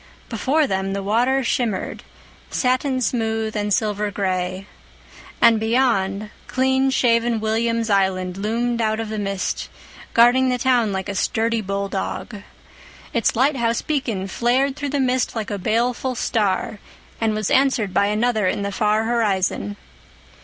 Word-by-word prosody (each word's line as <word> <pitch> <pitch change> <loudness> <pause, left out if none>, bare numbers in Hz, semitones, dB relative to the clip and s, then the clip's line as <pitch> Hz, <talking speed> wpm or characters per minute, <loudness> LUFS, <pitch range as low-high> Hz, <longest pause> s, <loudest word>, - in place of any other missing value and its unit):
Before 265 +7 +1
them 190 -5 -2
the 200 0 -3
water 245 +6 +2
shimmered, 235 -5 -1 0.5
satin 255 +1 0
smooth 225 -2 -1
and 205 0 -1
silver 210 0 0
gray, 185 -1 -2 0.7
and 230 -2 +5
beyond, 215 -3 +1 0.2
clean 265 +1 +2
shaven 235 -3 +2
William's 225 +1 0
Island 190 -3 +1
loomed 230 +4 -1
out 220 0 0
of 225 -1 -4
the 215 -1 -3
mist, 195 -2 -3 0.5
guarding 245 +3 +5
the 250 - +1
town 245 -4 +2
like 190 0 -3
a 200 - -3
sturdy 225 +3 0
bulldog. 200 +2 -4 0.7
Its 235 -5 +1
lighthouse 240 -2 +1
beacon 235 -10 -2
flared 255 +7 +1
through 290 -1 -4
the 285 +1 -1
mist 255 -1 0
like 220 -2 -3
a 205 - -3
baleful 240 +5 0
star, 210 -2 -1 0.4
and 220 -1 +1
was 215 -2 -2
answered 260 -8 +2
by 200 - +3
another 215 -1 +1
in 200 - -1
the 200 - -2
far 215 +1 +1
horizon. 195 - 0
225 Hz, 140 wpm, -21 LUFS, 200-245 Hz, 0.7 s, and